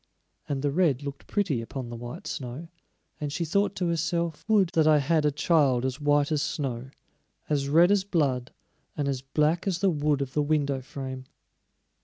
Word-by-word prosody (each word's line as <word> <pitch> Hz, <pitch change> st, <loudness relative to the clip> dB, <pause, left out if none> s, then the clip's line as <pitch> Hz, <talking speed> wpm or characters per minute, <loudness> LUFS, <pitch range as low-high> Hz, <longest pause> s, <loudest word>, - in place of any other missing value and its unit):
And 140 Hz, -1 st, -2 dB
the 145 Hz, -, +1 dB
red 150 Hz, -4 st, +2 dB
looked 140 Hz, -1 st, -7 dB
pretty 180 Hz, -, 0 dB
upon 120 Hz, +1 st, -6 dB
the 120 Hz, -, -6 dB
white 120 Hz, +1 st, -8 dB
snow, 135 Hz, +6 st, -6 dB, 0.5 s
and 145 Hz, -1 st, -3 dB
she 170 Hz, +3 st, -2 dB
thought 200 Hz, +5 st, +1 dB
to 180 Hz, -, -1 dB
herself: 170 Hz, 0 st, -1 dB
"Would 205 Hz, -5 st, +4 dB
that 160 Hz, -2 st, +2 dB
I 155 Hz, -1 st, +6 dB
had 155 Hz, +2 st, +2 dB
a 150 Hz, -, +3 dB
child 140 Hz, -4 st, +2 dB
as 130 Hz, +3 st, -3 dB
white 145 Hz, 0 st, +2 dB
as 150 Hz, -2 st, +1 dB
snow, 130 Hz, -5 st, -3 dB, 0.6 s
as 140 Hz, -2 st, 0 dB
red 170 Hz, +5 st, +6 dB
as 205 Hz, -2 st, +3 dB
blood, 140 Hz, -10 st, 0 dB, 0.5 s
and 145 Hz, -2 st, -1 dB
as 135 Hz, -2 st, -1 dB
black 150 Hz, +6 st, 0 dB
as 185 Hz, -3 st, +1 dB
the 195 Hz, +1 st, +2 dB
wood 145 Hz, -2 st, +1 dB
of 135 Hz, -, -9 dB
the 150 Hz, -, +2 dB
window 145 Hz, -3 st, 0 dB
frame!" 130 Hz, 0 st, -7 dB
145 Hz, 190 wpm, -27 LUFS, 135-165 Hz, 0.6 s, I